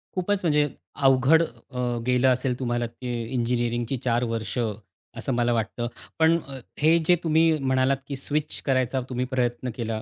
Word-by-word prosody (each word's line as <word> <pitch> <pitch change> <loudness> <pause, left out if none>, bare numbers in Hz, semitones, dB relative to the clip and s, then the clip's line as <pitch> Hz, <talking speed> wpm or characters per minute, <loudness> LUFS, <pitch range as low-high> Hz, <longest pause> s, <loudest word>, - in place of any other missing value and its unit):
खूपच 190 +2 0
म्हणजे 150 -2 +3 0.4
अवघड 135 +5 +5
अ, 125 -1 -8 0.3
गेलं 125 +1 +3
असेल 125 0 0
तुम्हाला 120 -1 -1
ते 120 +2 -7 0.2
इंजिनिअरिंगची 120 0 0
4 120 0 +2
वर्ष 115 +2 -4 0.6
असं 135 - -2
मला 120 0 +2
वाटतं. 115 +1 -2 0.3
पण 160 +1 +5
अ, 135 -1 -7 0.2
हे 160 +3 +5
जे 180 - +6
तुम्ही 160 0 +4
म्हणालात 130 0 +2
की 140 - -4
स्विच 150 +3 -2
करायचा 130 -1 +1
तुम्ही 125 0 -1
प्रयत्न 125 0 -1
केला 110 -2 -3
130 Hz, 155 wpm, -25 LUFS, 120-145 Hz, 0.6 s, जे